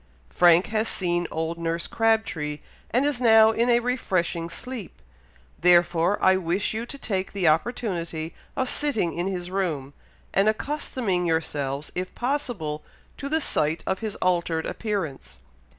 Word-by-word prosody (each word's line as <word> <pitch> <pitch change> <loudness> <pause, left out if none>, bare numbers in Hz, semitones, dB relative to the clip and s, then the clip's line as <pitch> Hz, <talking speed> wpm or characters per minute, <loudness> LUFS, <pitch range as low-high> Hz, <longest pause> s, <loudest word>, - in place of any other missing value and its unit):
Frank 175 0 +5
has 220 +1 +1
seen 175 -3 0
old 160 +1 -3
nurse 170 0 -2
Crabtree, 220 -10 0 0.3
and 250 +4 +2
is 285 -4 0
now 220 -2 +7
in 235 +2 +1
a 240 0 +5
refreshing 185 -9 -1
sleep, 250 +1 -7 0.6
therefore 175 +1 +4
I 190 0 +6
wish 185 +3 -1
you 225 +2 -3
to 280 - -7
take 195 -7 -2
the 190 -4 +1
opportunity 170 -3 -1 0.2
of 260 -2 0
sitting 250 - 0
in 175 +2 -2
his 180 -2 -4
room, 155 -8 -2 0.4
and 195 +2 +4
accustoming 215 - -1
yourselves, 145 -3 -1
if 185 +1 -4
possible, 240 - -2 0.3
to 280 - -5
the 315 +2 +2
sight 155 - 0
of 190 - -1
his 220 -2 -4
altered 170 -3 0
appearance. 195 -11 -4
185 Hz, 145 wpm, -25 LUFS, 165-225 Hz, 0.6 s, now